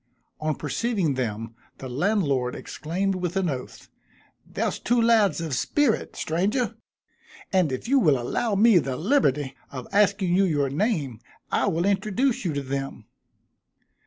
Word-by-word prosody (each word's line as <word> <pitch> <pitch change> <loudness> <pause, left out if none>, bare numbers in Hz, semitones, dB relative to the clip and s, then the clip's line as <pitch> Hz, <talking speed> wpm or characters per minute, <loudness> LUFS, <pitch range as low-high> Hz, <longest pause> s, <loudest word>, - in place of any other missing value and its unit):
On 155 -1 -1
perceiving 190 - -1
them 115 -3 -3 0.2
the 130 - -7
landlord 140 - 0
exclaimed 190 +5 -3
with 180 -1 -3
an 190 -2 +1
oath, 130 -2 -7 0.6
"There's - - -3
two 240 +1 +1
lads 220 -8 +4
of 165 -4 -3
spirit! 250 - 0
stranger 210 +8 -1 0.8
and 180 -6 +3
if 130 - -4
you 275 +2 +4
will 150 - +3
allow 205 - -1
me 210 -2 +6
the 135 -4 -3
liberty 150 - +1 0.2
of 130 -3 -7
asking 200 -3 +3
you 195 +1 +4
your 145 -6 0
name, 145 - -1 0.3
I - - +1
will 170 +3 0
introduce 215 +6 +1
you 165 - 0
to 140 -1 -2
them." 135 0 -4
175 Hz, 145 wpm, -25 LUFS, 140-210 Hz, 0.8 s, me